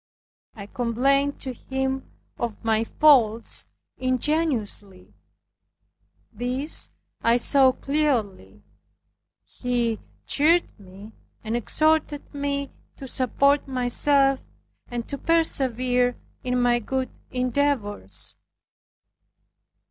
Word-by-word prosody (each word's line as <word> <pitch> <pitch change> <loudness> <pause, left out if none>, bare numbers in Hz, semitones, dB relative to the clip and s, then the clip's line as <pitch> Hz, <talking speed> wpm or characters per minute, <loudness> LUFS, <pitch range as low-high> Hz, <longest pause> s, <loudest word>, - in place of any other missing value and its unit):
I 200 -3 -8
complained 265 +6 +1
to 260 -2 -4
him 265 +2 -3 0.3
of 235 -3 -2
my 220 0 +2
faults 235 -6 +3 0.3
ingenuously. 255 - -2 1.2
These 250 +7 0 0.3
I 230 +1 +4
saw 265 +1 +5
clearly. 225 - -2 0.8
He 240 -3 -2 0.3
cheered 330 +4 +3 0.2
and 205 +3 -9
exhorted 310 +5 0
me 280 -1 -2 0.3
to 275 - -8
support 280 +3 +1
myself, 270 +2 +3 0.5
and 240 -2 -5
to 280 - -5
persevere 255 -6 +2 0.3
in 250 0 0
my 240 -1 +3
good 260 +3 -3 0.2
endeavors. 250 - -2
255 Hz, 80 wpm, -24 LUFS, 230-280 Hz, 1.2 s, saw